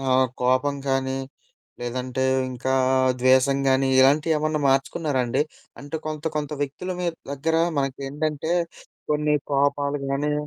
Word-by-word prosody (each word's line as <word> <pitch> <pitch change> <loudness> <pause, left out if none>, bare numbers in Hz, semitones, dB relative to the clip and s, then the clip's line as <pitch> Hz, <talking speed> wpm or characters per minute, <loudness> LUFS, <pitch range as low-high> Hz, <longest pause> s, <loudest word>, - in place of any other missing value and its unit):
ఆహ్, 130 -1 +3 0.2
కోపం 130 +3 +2
గానీ, 135 0 0 0.6
లేదంటే 125 +2 -2 0.3
ఇంకా 130 +1 -2 0.5
ద్వేసం 130 +2 +4
గానీ 135 0 +3
ఇలాంటియేమన్నా 150 +2 +3
మార్చుకున్నారాండి? 135 -1 +1 0.4
అంటే 145 +3 -5
కొంత, 155 0 -5
కొంత 150 -1 -2
వ్యక్తులు 165 +6 -4
మీ 175 - 0 0.2
దగ్గర 155 +4 -1 0.2
మనకేంటంటే 140 +3 -2 0.6
కొన్ని 150 0 +2 0.2
కోపాలు 140 +1 +1
గాని 145 +2 0
140 Hz, 110 wpm, -24 LUFS, 130-150 Hz, 0.6 s, ద్వేసం